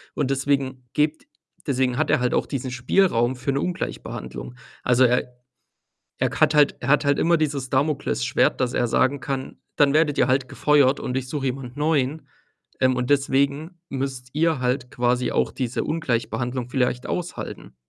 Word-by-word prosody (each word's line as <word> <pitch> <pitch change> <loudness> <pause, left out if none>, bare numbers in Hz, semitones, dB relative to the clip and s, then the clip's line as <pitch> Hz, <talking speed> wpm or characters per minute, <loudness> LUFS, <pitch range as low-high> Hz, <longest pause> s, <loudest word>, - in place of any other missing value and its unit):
und 140 -2 0
deswegen 135 -2 -1
gibt 150 +1 0 0.4
deswegen 130 -2 +1
hat 155 +1 0
er - - +3
halt 125 - +1
auch - - +1
diesen 130 -2 -4
Spielraum 130 -2 +2
für 130 +2 -2
'ne 140 - 0
Ungleichbehandlung. 125 - -5 0.3
Also, 125 +1 +4
er 125 0 +1 0.8
er - - +1
k - - -7
hat 155 0 +4
halt 150 -1 +5
er - - -6
hat 150 +1 +4
halt 140 0 +2
immer 170 +1 +4
dieses 140 -4 -2
Damoklesschwert, 135 - +1
dass 125 -1 0
er 120 - +1
sagen 130 +4 +2
kann: 135 -1 -4 0.2
„Dann 145 -1 +4
werdet 150 -2 +2
ihr - - +3
halt 130 0 +1
gefeuert 145 -2 +3
und 125 +1 -2
ich 130 - -3
suche 140 -3 -2
jemand 125 -1 -5
neuen.“ 150 -1 0 0.5
Ähm, 130 0 +3
und 125 +1 -2
deswegen 140 +4 +1
müsst 130 -2 -4
ihr 160 -1 +1
halt 125 0 -1
quasi 125 0 0
auch - - +1
diese 125 -2 -2
Ungleichbehandlung 125 -4 -2
vielleicht 125 -1 0
aushalten. 180 0 -5
135 Hz, 170 wpm, -23 LUFS, 125-145 Hz, 0.8 s, halt